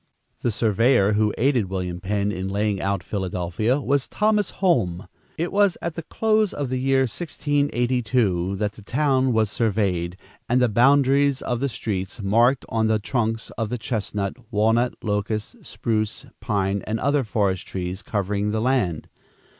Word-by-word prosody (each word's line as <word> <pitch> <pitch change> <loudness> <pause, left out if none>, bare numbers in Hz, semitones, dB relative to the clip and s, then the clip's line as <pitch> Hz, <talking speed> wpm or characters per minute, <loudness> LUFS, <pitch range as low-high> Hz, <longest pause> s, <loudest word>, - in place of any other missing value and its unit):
The - - 0
surveyor 110 0 +3
who 105 0 +2
aided 120 -6 +2
William 90 -2 -3
Penn 100 +2 -1
in 95 -1 -4
laying 100 0 -1
out 100 -2 -1
Philadelphia 95 +6 -1
was 140 -1 0
Thomas 210 -2 +1
Holme. 100 - 0 0.3
It 170 +2 -2
was 200 -2 +3
at 170 - -3
the 165 - -5
close 215 +5 +1
of 140 -3 -3
the 130 0 -1
year 135 +1 +2
1682, 125 - 0
that 105 +1 -1
the 105 - -14
town 130 +3 +1
was 110 -3 +1
surveyed, 95 -6 0 0.3
and 125 +2 +3
the 125 -1 +3
boundaries 135 +3 +3
of 120 -1 -1
the 140 +2 0
streets 95 -5 -4
marked 115 +6 +3
on 110 -1 0
the 110 0 +3
trunks 115 +1 -2
of 110 -2 -1
the 125 - -2
chestnut, 105 -3 -3 0.2
walnut, 115 +4 +2
locust, 105 - -2
spruce, 110 -3 -2
pine 100 -3 -1
and 110 +1 -1
other 140 0 +2
forest 100 -4 -1
trees 90 +1 -4
covering 100 0 -1
the 110 +1 -1
land. 110 -10 0
110 Hz, 155 wpm, -23 LUFS, 100-130 Hz, 0.3 s, surveyor